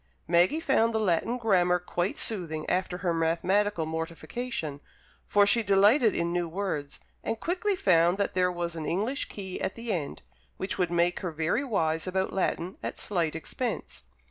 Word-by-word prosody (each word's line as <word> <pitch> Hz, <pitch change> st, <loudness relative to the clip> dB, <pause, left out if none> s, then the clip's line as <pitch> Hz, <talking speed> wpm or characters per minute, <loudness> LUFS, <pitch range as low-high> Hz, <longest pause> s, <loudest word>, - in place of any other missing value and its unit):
Maggie 175 Hz, -, +4 dB
found 230 Hz, -7 st, +2 dB
the -, -, +2 dB
Latin 210 Hz, +4 st, +1 dB
Grammar 180 Hz, -6 st, +3 dB
quite 180 Hz, +1 st, -2 dB
soothing 165 Hz, -8 st, -1 dB
after 180 Hz, -1 st, 0 dB
her 170 Hz, -, +2 dB
mathematical 170 Hz, +3 st, +1 dB
mortification, 165 Hz, -, -4 dB, 0.5 s
for 205 Hz, 0 st, +5 dB
she 230 Hz, +3 st, +3 dB
delighted 210 Hz, +4 st, +4 dB
in 170 Hz, 0 st, 0 dB
new 175 Hz, -1 st, -1 dB
words, 165 Hz, -6 st, -3 dB, 0.2 s
and 225 Hz, -, -2 dB
quickly 380 Hz, +4 st, 0 dB
found 175 Hz, -, +3 dB
that 200 Hz, -, -1 dB
there 180 Hz, -1 st, +2 dB
was 170 Hz, -1 st, -3 dB
an 160 Hz, -2 st, -4 dB
English 220 Hz, +11 st, -1 dB
Key 190 Hz, -3 st, -6 dB
at -, -, -2 dB
the 230 Hz, -1 st, -3 dB
end, 155 Hz, -5 st, -4 dB, 0.3 s
which 190 Hz, +1 st, -4 dB
would 180 Hz, -2 st, +2 dB
make 175 Hz, +1 st, +1 dB
her 180 Hz, -, -3 dB
very 160 Hz, -, 0 dB
wise 165 Hz, -, 0 dB
about 190 Hz, +1 st, -1 dB
Latin, 185 Hz, -1 st, -1 dB
at -, -, -4 dB
slight 170 Hz, -6 st, -1 dB
expense. 240 Hz, +9 st, -4 dB
180 Hz, 170 wpm, -28 LUFS, 170-210 Hz, 0.5 s, for